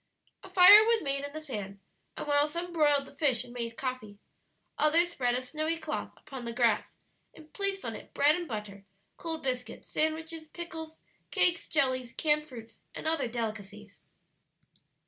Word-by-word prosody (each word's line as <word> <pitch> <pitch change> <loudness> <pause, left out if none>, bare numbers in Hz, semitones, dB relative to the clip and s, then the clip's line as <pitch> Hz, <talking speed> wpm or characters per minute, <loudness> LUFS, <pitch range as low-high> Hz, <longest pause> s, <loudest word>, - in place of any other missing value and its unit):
A - - -11
fire 380 +3 +9
was 455 -1 +2
made 275 -1 -1
in 285 - -5
the 310 - -6
sand, 205 -10 -6 0.4
and - - -4
while 290 0 +3
some 340 +3 -5
broiled 290 -3 +3
the 275 - -15
fish 275 -5 +2
and 240 - -12
made 230 -1 -5
coffee, 255 -6 -5 0.6
others 335 +3 +3
spread 245 -6 0
a 255 - -2
snowy 310 +5 -2
cloth - - -4
upon 265 -3 -9
the 235 - -4
grass, 230 -3 +1 0.4
and 310 -1 -16
placed 395 -1 -2
on - - -4
it - - -11
bread 290 +2 +4
and 350 -1 -4
butter, 210 -4 -6 0.3
cold 325 -1 -5
biscuits, 250 -2 -4
sandwiches, 315 +1 -2
pickles, 320 -1 -8 0.3
cakes, 350 -1 +2
jellies, 255 -5 0
canned 300 -1 +1
fruits, 230 -4 -11 0.2
and - - -7
other 320 -5 +1
delicacies. 215 -3 -6
285 Hz, 165 wpm, -30 LUFS, 240-320 Hz, 0.6 s, fire